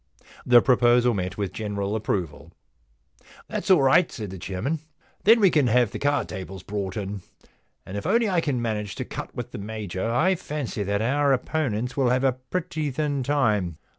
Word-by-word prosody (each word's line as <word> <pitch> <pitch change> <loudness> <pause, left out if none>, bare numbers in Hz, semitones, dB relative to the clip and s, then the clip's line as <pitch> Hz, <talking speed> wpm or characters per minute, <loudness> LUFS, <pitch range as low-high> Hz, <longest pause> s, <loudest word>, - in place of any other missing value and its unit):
* - - -21
The 120 -1 +8
proposal 120 -1 +4
met 95 -2 -3
with 100 -3 -3
general 105 -1 -3
approval. 95 -8 -3 0.6
* - - -24
That's 195 - -4
all 180 -7 +6
right,' 135 +6 +4
said 105 -5 -6
the 95 - -8
chairman. 100 - -3 0.2
* - - -35
Then 225 +3 +7
we 195 -4 +5
can 145 -5 +3
have 120 -1 +3
the - - -5
card 145 0 +1
tables 95 -2 -7
brought 100 -2 -4
in. 100 -1 -4 0.6
And 95 - -8
if 100 - -3
I 210 +5 +4 0.2
can 145 -5 -1
only - - -1
manage 105 -4 -3
to - - -4
cut - - -7
with - - -5
the - - -6
Major, 105 -1 -4
I 155 +11 +3
fancy 150 - -4
that 100 +1 -1
our 140 +3 +2
opponents 125 -3 -1
will 135 -3 +2
have 130 +1 +1
a 135 - +4
pretty 155 +4 -4
thin 145 0 -1
time. 110 - +1
120 Hz, 195 wpm, -25 LUFS, 100-145 Hz, 0.6 s, The